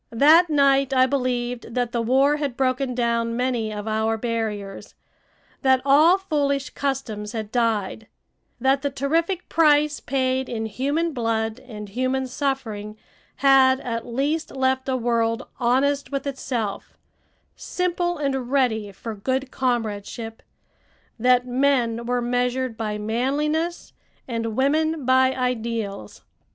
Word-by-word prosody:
That 315 +8 +6
night 275 -2 +3
I 255 0 +6
believed 245 -3 -2
that 245 -2 0
the 235 - -1
war 270 +5 +3
had 280 -5 -3
broken 255 -1 0
down 235 -1 0
many 245 -3 -1
of 210 0 -6
our 220 +1 0
barriers; 215 -4 -4 0.7
that 265 -2 +4
all 305 +6 +6
foolish 290 -6 -1
customs 245 -7 -3
had 215 -2 -5
died; 220 -3 -1 0.5
that 265 +2 +2
the 285 - -1
terrific 325 +7 -1
price 300 -2 +3
paid 260 0 -1
in 225 -2 -3
human 285 +9 -1
blood 225 -2 -1
and 215 -5 -9
human 255 +5 -1
suffering 245 -6 -3 0.4
had 265 -1 +5
at 230 -2 -3
least 280 +7 -2
left 260 0 0
a 260 - +1
world 230 0 0
honest 275 +4 +1
with 275 0 -3
itself, 250 -6 -4 0.6
simple 350 -1 -2
and 270 -4 -2
ready 220 -7 +1
for 220 +3 -7
good 260 +6 -2
comradeship; 225 -2 -3 0.8
that 250 +1 +4
men 245 -3 +1
were 245 0 0
measured 250 0 -1
by 215 -1 -3
manliness 290 +10 -1 0.3
and 230 -3 -3
women 310 +2 +1
by 260 0 +4
ideals. 230 - -3
255 Hz, 125 wpm, -23 LUFS, 230-275 Hz, 0.8 s, That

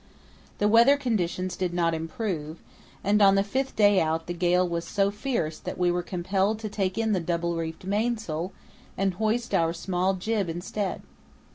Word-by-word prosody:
The 205 - +2
weather 235 +6 +6
conditions 185 -8 -1
did 180 -2 -2
not 170 -1 +2
improve, 160 -1 -4 0.5
and 210 +1 +3
on 195 -1 +7
the 195 - +3
fifth 260 +7 -2
day 205 -2 +5
out 160 0 0
the 175 - -4
gale 180 +1 +2
was 170 -1 -2
so 195 +3 +1
fierce 205 - -2
that - - -6
we 180 -1 +2
were 175 0 0
compelled 190 +4 0
to 215 - -4
take 195 -1 -2
in 225 -1 +1
the 195 - +2
double 170 0 -1
reefed 165 0 -4
mainsail 200 -5 -1 0.5
and 195 -1 +1
hoist 220 +5 -1
our 165 0 +2
small 185 +2 0
jib 200 0 -1
instead. 185 +4 -3
185 Hz, 175 wpm, -26 LUFS, 170-210 Hz, 0.5 s, on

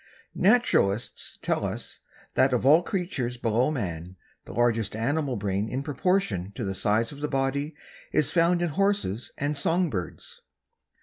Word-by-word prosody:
Naturalists 185 - +2
tell - - 0
us - - -4 0.3
that 130 0 +3
of 125 - +1
all 155 +5 +7
creatures 170 - -3
below 120 +3 +1
man, 90 - -4 0.3
the - - -9
largest 115 -1 +1
animal 135 +4 0
brain 100 0 -1
in 130 +2 -3
proportion 140 - 0
to - - -4
the 95 -1 -2
size 105 +4 +1
of 145 - -10
the 150 - 0
body 140 +2 -1 0.4
is 150 -1 +2
found 175 +1 +3
in 175 - +1
horses 195 - 0
and 145 +2 -1
song 165 +3 +1
birds. 90 -5 -6
130 Hz, 150 wpm, -27 LUFS, 110-160 Hz, 0.4 s, all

